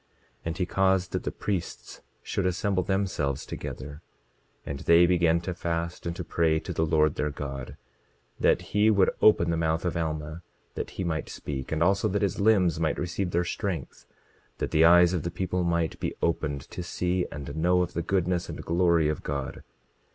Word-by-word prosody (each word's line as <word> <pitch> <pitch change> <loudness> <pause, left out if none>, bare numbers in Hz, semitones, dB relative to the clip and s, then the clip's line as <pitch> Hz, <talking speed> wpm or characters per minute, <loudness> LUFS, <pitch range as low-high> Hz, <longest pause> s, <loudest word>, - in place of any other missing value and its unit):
27:22 - - -41 0.4
And 85 0 -3
he 90 - 0
caused 95 -1 +1
that - - -2
the - - -1
priests 85 -11 -4 0.2
should 95 - -1
assemble 95 +1 0
themselves 90 -8 -1
together; 70 +3 -7 0.6
and 70 -1 -5
they 85 +1 +6
began 85 -2 +3
to 90 +1 -4
fast, 85 0 -3
and 85 - -3
to - - -5
pray 80 -2 +1
to - - -6
the 80 - 0
Lord 75 -1 +3
their 75 - -1
God 70 -3 -6 0.6
that - - +3
he 105 +2 +4
would 100 -3 +4
open 85 -5 +5
the 85 - 0
mouth 80 +1 0
of 90 - -1
Alma, 80 0 -3 0.3
that - - -4
he 95 - -1
might 80 -3 -2
speak, 65 -3 -6
and 80 +1 +1
also 100 +4 +2
that 100 0 0
his 100 - -1
limbs 95 -6 +3
might 80 -1 0
receive 90 +2 -2
their 85 0 0
strength—that 85 - -6
the 80 - +4
eyes 85 +1 +7
of 90 - 0
the 85 - -3
people 90 +1 -2
might 85 -1 0
be - - -3
opened 75 -4 -1
to - - -5
see 90 +1 -1
and 70 0 -7
know 90 +3 +3
of 90 - -5
the 85 - -1
goodness 90 0 0
and - - -7
glory 85 -2 +3
of 75 -1 -2
God. 70 -2 -4
85 Hz, 190 wpm, -27 LUFS, 80-90 Hz, 0.6 s, eyes